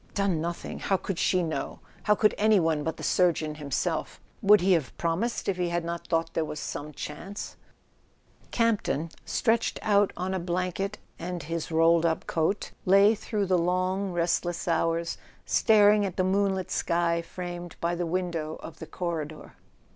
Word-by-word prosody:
Done 195 -5 +1
nothing! 170 +1 -4
How 195 - +1
could 185 -1 -4
she 185 -1 +2
know? 155 -4 -3 0.3
How 210 - +5
could 210 0 +3
any 215 -1 +4
one, 160 -3 +1
but 160 0 -3
the - - -8
surgeon 165 -4 +2
himself? 150 +3 -2 0.2
Would 210 0 +7
he 190 +2 +3
have 160 -7 -1
promised 175 +8 -1
if 195 -2 0
he 175 -1 0
had 170 -1 -1
not 170 0 -5
thought 165 0 0
there 165 - +1
was 150 -1 -5
some 150 +1 -5
chance? 180 +7 -7 0.9
Campton, 210 - 0
stretched 225 0 +1
out 205 -1 +3
on 185 +2 -2
a 190 - -1
blanket 185 +3 -2 0.2
and 175 0 -4
his 165 +1 -4
rolled 165 +1 +4
up 165 -1 0
coat, 165 +5 -1
lay 200 +3 +6
through 210 -1 -2
the 185 -1 +2
long 185 +3 0
restless 175 0 -1
hours 165 0 0 0.3
staring 210 -1 +5
at 190 -3 -3
the 185 - +2
moonlit 190 0 +1
sky 170 0 +1
framed 175 0 -7
by 170 +1 0
the 175 0 -2
window 170 -3 -2
of 160 -1 -9
the 160 - -7
corridor. 160 -4 -5
175 Hz, 170 wpm, -27 LUFS, 165-195 Hz, 0.9 s, Would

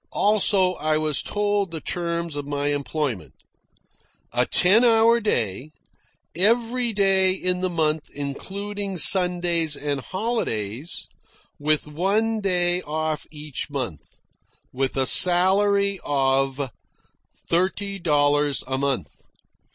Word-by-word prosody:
Also, 200 -3 +3
I 155 0 0
was 155 -2 0
told 205 -2 -2
the 165 -1 -7
terms 170 -1 -4
of 145 -1 -6
my 145 0 -2
employment 145 - -4 1.0
a 125 0 0
ten 200 +7 +5
hour 230 0 +4
day, 125 - -2 0.7
every 235 +5 +1
day 195 -2 +2
in 180 -1 -1
the 185 - -1
month 155 -2 -1
including 195 +7 -6
Sundays 175 -4 +4
and 145 -1 -2
holidays, 160 - -4 0.5
with 150 +1 0
one 200 +9 -1
day 180 -2 0
off 155 -1 -4
each 150 -2 -7
month, 125 - -6 0.6
with 135 +1 -3
a 135 - +2
salary 195 +4 +4
of 135 -1 0 0.7
thirty 195 +3 -2
dollars 145 -3 +1
a 130 0 -3
month. 135 - -2
170 Hz, 110 wpm, -22 LUFS, 145-195 Hz, 1.0 s, ten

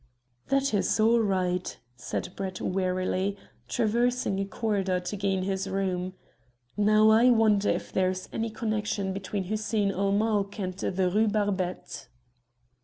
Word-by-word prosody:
"That 275 -2 +1
is 195 +1 +1
all 230 +2 +5
right," 185 -4 0 0.2
said 120 - -4
Brett 190 -1 -4
wearily, 185 +1 -1 0.3
traversing 235 -2 +1
a 195 - 0
corridor 195 -3 -1
to 180 +3 -5
gain 195 -2 0
his 195 0 -2
room. 185 -1 -2 0.6
"Now, 215 +1 +5
I 230 +3 +6
wonder 215 -4 +4
if - - -2
there 185 -1 +2
is 185 0 -4
any 225 0 -1
connexion 210 -3 -2
between 195 +1 -3
Hussein 210 +1 0
ul 195 +1 0
Mulk 205 -1 0
and 185 -2 -2
the 185 0 -1
Rue 210 +5 +2
Barbette." 200 -4 -2
200 Hz, 140 wpm, -27 LUFS, 185-215 Hz, 0.6 s, I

